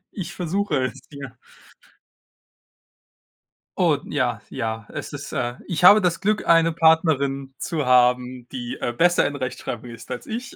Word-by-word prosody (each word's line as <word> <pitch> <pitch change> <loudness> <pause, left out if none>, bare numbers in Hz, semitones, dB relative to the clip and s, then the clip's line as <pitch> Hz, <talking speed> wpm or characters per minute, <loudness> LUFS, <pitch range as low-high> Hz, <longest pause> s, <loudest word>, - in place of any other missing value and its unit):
Ich 175 -3 -6
versuche 175 -5 -1
es, 130 +2 -6
ja. 140 -4 -9 2.4
Oh, - - +3
ja, - - -1
ja. 110 0 -4
Es - - -6
ist - - -7
äh, 120 0 -2
ich 175 -2 -3
habe 205 +4 +9
das 175 -3 0
Glück, 210 +1 0
eine 165 0 +5
Partnerin 140 -5 +2
zu 155 -5 -3
haben, 125 0 +2
die, 120 -2 -6
äh, 120 - -2
besser 175 +6 +3
in 145 - -2
Rechtschreibung 130 -2 -5
ist 115 -1 -11
als 120 - -6
ich. 245 +4 -6
140 Hz, 150 wpm, -23 LUFS, 125-175 Hz, 2.4 s, habe